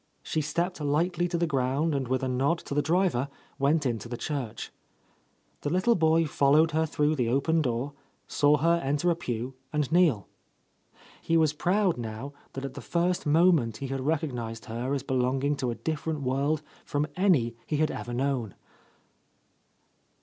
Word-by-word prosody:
She 155 - -1
stepped 170 +3 -2
lightly 170 +4 +1
to 175 0 -1
the 170 - +1
ground 140 +2 0
and 135 -3 -1
with 130 +1 0
a - - 0
nod 135 +6 +1
to - - -4
the 145 - +2
driver 155 -4 +1 0.3
went 145 +2 +2
into 115 -2 -2
the 120 - -4
church. 125 -7 -4 0.9
The 145 - -2
little 185 +8 +3
boy 165 -3 +3
followed 150 +2 +3
her 160 +1 +1
through 150 +1 +1
the 125 -5 0
open 160 +6 +2
door, 130 +1 -2 0.3
saw 145 +1 +3
her 170 +3 +2
enter 145 +6 +1
a - - +1
pew 125 -4 -4 0.2
and 150 -2 -1
kneel. 160 - +3 0.9
He 165 - +2
was 155 -2 +3
proud 180 0 +1
now 115 +5 -6 0.2
that 135 0 -5
at 135 - -6
the - - -8
first 175 -1 0
moment 155 -8 +4
he 135 +2 -5
had 135 0 -2
recognized 125 -7 -2
her 125 +4 -2
as 135 - -3
be 135 - -3
longing 130 +3 +1
to 130 -2 -1
a 120 - -2
different 155 0 -3
world 140 +4 0 0.2
from 145 +1 -1
any 155 - +2
he 150 - 0
had 155 0 +2
ever 120 - -6
known. 125 -4 -1
145 Hz, 175 wpm, -28 LUFS, 130-160 Hz, 0.9 s, moment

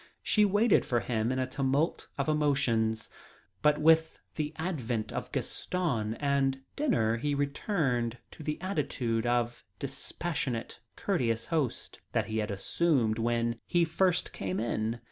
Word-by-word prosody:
She 210 -1 +4
waited 205 +2 +4
for 120 -2 0
him 115 0 0
in 130 - -1
a 130 - +1
tumult 135 +4 0
of 140 - -1
emotions, 135 -7 +2 0.5
but 150 0 +4
with 160 +1 +4 0.2
the 150 -1 -2
advent 125 -10 -2
of - - -4
Gaston 125 -12 -1
and 135 -1 +1
dinner 115 - +2
he 145 +4 0
returned 140 - 0
to - - -12
the 150 0 -3
attitude 125 - -1
of 120 0 0
dispassionate, 135 -9 -3 0.2
courteous 115 - 0
host 150 -8 -2
that 115 -3 +2
he 110 +1 -2
had 105 0 -1
assumed 115 - +1
when 115 0 0
he 175 -1 +3
first 175 +2 +1
came 95 0 -2
in. 115 0 -1
130 Hz, 140 wpm, -30 LUFS, 115-160 Hz, 0.5 s, She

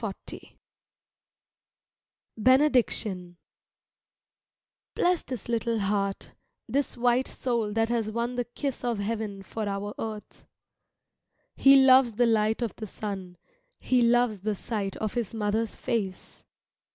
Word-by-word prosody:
jpg] 200 -3 -7 1.9
BENEDICTION 230 - +2 1.6
Bless 355 -1 +2
this 250 -6 -7
little 230 0 0
heart, 200 -1 -1 0.4
this 280 -1 -1
white 245 +2 +2
soul 235 -4 -2
that 225 +1 +1
has 230 -3 0
won 235 +2 -2
the 245 -1 -2
kiss 265 +2 -4
of 240 -2 0
heaven 205 -1 -3
for 215 +1 -4
our 200 +1 -4
earth. 215 -2 -7 1.1
He 275 0 +7
loves 260 -3 +6
the 240 +3 +3
light 220 0 +2
of 230 - -3
the 215 - -6
sun, 190 -3 -6 0.4
he 255 -1 +2
loves 235 -3 +3
the 210 +2 -2
sight 200 -2 -4
of 215 -2 -3
his 235 -2 -3
mother's 215 +1 -1
face. 200 -5 -4
225 Hz, 120 wpm, -27 LUFS, 205-245 Hz, 1.9 s, He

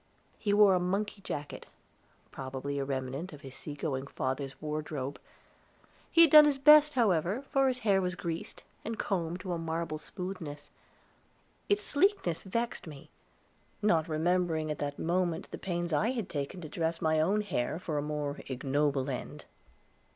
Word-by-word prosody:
He 205 - 0
wore 205 -1 +6
a 180 - +3
monkey 195 +3 -2
jacket, 145 -5 -6 0.6
probably 135 +1 -4
a - - 0
remnant 135 +5 -4
of 145 - -11
his 135 -1 -10
sea 145 +2 -7
going 140 -2 -3
father's 135 0 -3
wardrobe. 150 -3 -4 0.9
He 335 - +5
had 330 -4 +7
done 305 -1 +10
his 290 -2 +2
best, 300 +1 +7
however, 200 - +2
for 270 -2 +4
his 255 -1 +1
hair 195 -2 +4
was 180 0 -1
greased, 170 -2 -5 0.2
and 225 0 -4
combed 175 -2 -2
to 185 -2 -3
a 170 - -2
marble 165 -1 -3
smoothness; 180 -3 -7 1.0
its 410 0 +2
sleekness 295 - +1
vexed 230 +1 -3
me, 145 -3 -11 0.7
not 165 -6 +3
remembering 160 -1 +1
at 150 - -4
that 145 0 -3
moment 175 0 -1
the - - -6
pains 175 -2 -2
I 200 +10 +2
had 230 -7 -3
taken 145 +5 -4
to 160 - -6
dress 165 +1 -2
my 160 0 +2
own 200 +6 +2
hair, 160 -10 -2
for 155 -4 -2
a - - -1
more 150 -1 -3
ignoble 135 +1 0
end. 130 -3 -5
165 Hz, 165 wpm, -31 LUFS, 145-200 Hz, 1.0 s, done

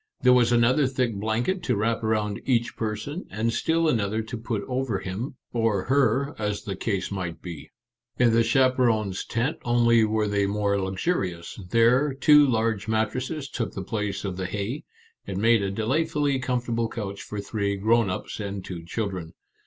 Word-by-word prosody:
There 125 0 +6
was 120 -1 +4
another 125 +4 +4
thick 125 -3 0
blanket 110 - -1
to 130 -8 0
wrap 110 +2 0
around 105 -2 0
each 120 -3 +1
person, 110 - -4
and 110 +3 -1
still 165 +4 +1
another 110 -5 0
to 110 +3 -6
put 115 -2 -3
over 130 -2 -1
him, 115 +10 -5 0.2
or 115 -5 +1
her, 135 +1 +2
as 105 -1 -2
the 100 - -4
case 100 -1 -2
might 90 -4 -4
be. 85 -5 -8 0.5
In 120 -2 +4
the 115 - +5
chaperons' 115 -5 +2
tent 125 +7 -1
only 115 -1 +4
were 110 0 +1
they 100 -1 +1
more 100 0 0
luxurious; 95 - -2
there, 125 +6 +3
two 150 +1 +6
large 110 -4 0
mat 110 -1 +1
tresses 135 +4 -4
took 115 -6 -4
the 95 - -4
place 105 0 -3
of 95 -2 -3
the 95 -1 -2
hay, 105 +9 -4 0.4
and 95 -1 -4
made 115 +1 +4
a 100 - -1
delightfully 140 +6 0
comfortable 120 -2 -1
couch 100 -4 -5
for 105 - -6
three 100 0 -2
grown 110 +2 +2
ups 90 - -5
and 100 -2 -5
two 85 -3 -6
children. 90 -2 -4
110 Hz, 175 wpm, -25 LUFS, 100-125 Hz, 0.5 s, There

